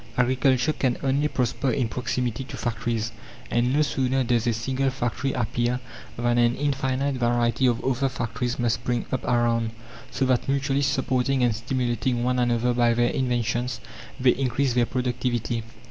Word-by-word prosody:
Agriculture 130 +2 +2
can 130 -4 0
only 140 +2 +2
prosper 130 0 -1
in 125 -2 +1
proximity 125 0 -2
to - - -8
factories. 115 -1 -2 0.4
And 120 +1 +2
no 150 +3 +3
sooner 135 -2 0
does 120 -1 +1
a 120 - +3
single 130 +4 0
factory 130 +1 -2
appear 120 0 0 0.4
than 120 0 +1
an 120 0 +3
infinite 135 -1 0
variety 120 +1 +2
of 120 -1 0
other 135 +1 +1
factories 120 0 -3
must 120 -2 0
spring 120 -1 -1
up 130 - -1
around, 120 -2 +1 0.4
so 135 - 0
that, 130 0 +1
mutually 140 0 +1
supporting 130 -1 +1
and 120 -3 +2
stimulating 120 +1 -1
one 125 0 +1
another 120 0 +2
by 120 -1 +3
their 120 0 +2
inventions, 120 -2 -1 0.4
they 125 -1 +5
increase 135 0 0
their 120 -1 +2
productivity. 125 -2 -1
125 Hz, 160 wpm, -25 LUFS, 120-130 Hz, 0.4 s, they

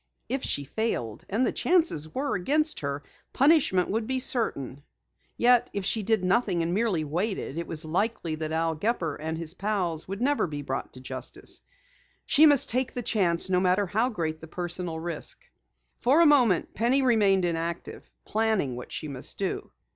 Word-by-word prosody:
If 265 0 -2
she 145 - -1
failed 140 - -3
and 225 +6 +1
the - - +1
chances 315 - +2
were 280 - -2
against 305 - +1
her 140 0 -4 0.3
punishment 270 - +4
would 220 +2 -1
be 260 - -1
certain. 145 - -1 0.6
Yet, 245 0 +4
if 200 -2 -3
she 220 - +1
did 215 -1 +1
nothing 185 -3 +1
and 170 +1 -1
merely 200 -6 +1
waited, 175 +1 -2
it 170 - -5
was 160 0 -2
likely 180 0 -1
that 155 0 -4
Al 165 0 0
Gepper 170 -2 -1
and 160 +1 -4
his 165 -1 0
pals 185 -5 -2
never 250 +9 +1
would - - -6
be 145 -1 -5
brought 135 -1 -4
to 130 - -11
justice. 130 0 -5 0.6
She 310 +2 +6
must 290 -3 +5
take 255 +2 0
the 245 - -4
chance, 180 -7 +1
no 185 -1 +2
matter 185 +2 +2
how 220 +7 +1
great 160 -8 -3
the 160 - -9
personal 175 -1 -4
risk. 175 - -3 0.5
For 270 +6 +4
a 340 - +7
moment 250 - +4
Penny 250 +5 +2
remained 205 -7 +3
inactive, 170 0 -4
planning 215 - 0
what 125 - -9
she 155 - -5
must 135 -3 -2
do. 195 - -3
185 Hz, 175 wpm, -27 LUFS, 160-235 Hz, 0.6 s, a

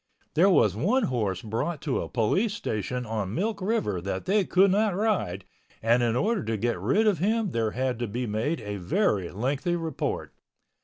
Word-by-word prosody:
There 175 +6 +5
was 110 - +4
one 210 - +2
horse 105 -8 -1
brought 115 +9 -2
to 140 -5 0
a - - -5
police 190 - +1
station 125 - -3
on 105 -2 -3
Milk 210 +3 -1
River 185 - 0
that 95 0 -4
they 200 +1 +3
could 190 +1 +4
not 205 -1 +2
ride 205 - -1 0.3
and 115 +2 +3
in 120 -1 +1
order 195 - +1
to 110 0 -2
get 115 -2 -1
rid 135 - +2
of 205 -7 +3
him 215 +1 +1
there 115 -4 0
had 125 +1 -2
to 120 - -2
be 120 +4 -3
made 115 +8 -1
a 105 -1 -4
very 100 - 0
lengthy 135 - -1
report. 165 -2 -3
125 Hz, 190 wpm, -27 LUFS, -, 0.3 s, There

